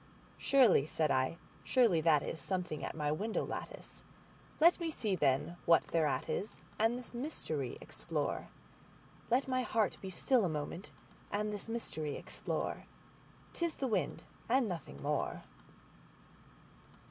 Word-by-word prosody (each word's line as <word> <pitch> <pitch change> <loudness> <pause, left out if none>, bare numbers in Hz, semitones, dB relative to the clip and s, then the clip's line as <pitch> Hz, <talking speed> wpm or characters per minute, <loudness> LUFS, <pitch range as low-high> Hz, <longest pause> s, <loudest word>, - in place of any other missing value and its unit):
"Surely," 240 - +5
said 155 -1 +1
I, 130 +5 +1 0.3
"surely 230 -11 +4
that 155 -3 +4
is 160 - -4
something 180 -1 -2
at - - -4
my 150 -2 0
window 210 +9 -1
lattice; - - -6 0.6
Let 340 +3 +6
me 335 -1 -1
see, 215 -10 -1
then, 145 +2 +1
what 165 -1 +6
thereat 155 -5 +1
is, 210 - -3 0.2
and 225 +3 +3
this 250 0 -9
mystery 200 - -3
explore; - - -3 0.8
Let 255 +4 +3
my 255 -1 +1
heart 225 -4 +1
be 190 - -5
still 225 +7 +2
a 180 - +2
moment 155 +4 -4 0.4
and 210 +1 -1
this 205 +2 -6
mystery 155 -10 -3
explore:'T - - -6
is 335 -2 +1
the 270 - -2
wind 235 - 0 0.3
and 250 0 +4
nothing 115 - -6
more." - - -1
190 Hz, 135 wpm, -34 LUFS, 155-240 Hz, 0.8 s, Let